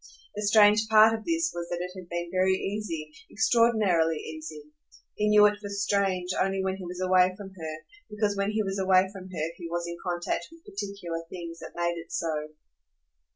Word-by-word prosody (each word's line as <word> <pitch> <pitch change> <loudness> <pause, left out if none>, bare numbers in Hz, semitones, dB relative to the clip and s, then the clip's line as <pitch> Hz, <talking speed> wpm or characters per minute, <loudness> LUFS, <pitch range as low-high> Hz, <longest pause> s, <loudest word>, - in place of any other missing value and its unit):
The 210 - -3
strange 210 +1 +5
part 220 0 +7
of 220 -1 -4
this 330 0 +1
was 170 0 -5
that 175 - -2
it 180 +1 -4
had 185 -2 -10
been 175 0 -4
very 185 0 +3
easy, 190 -7 -4 0.2
extraordinarily 215 -9 +3
easy. 155 -1 -8 0.5
He 210 0 0
knew 210 0 +7
it 205 0 +2
for 205 - -6
strange 200 -2 0
only 195 0 0
when 190 0 -1
he 185 - -8
was 180 +1 -7
away 185 0 +3
from 200 -2 -8
her, 160 -4 -6 0.3
because 210 -1 0
when 200 0 0
he 215 0 0
was 195 0 -3
away 190 0 +4
from 190 -2 -9
her 165 -3 -3
he 170 - -7
was 170 0 -2
in 170 0 -5
contact 175 -1 -2
with 330 0 -17
particular 195 -5 -5
things 170 -2 -7
that - - -10
made 170 -1 -1
it 165 - -21
so. 155 -2 -2
190 Hz, 200 wpm, -27 LUFS, 170-205 Hz, 0.5 s, part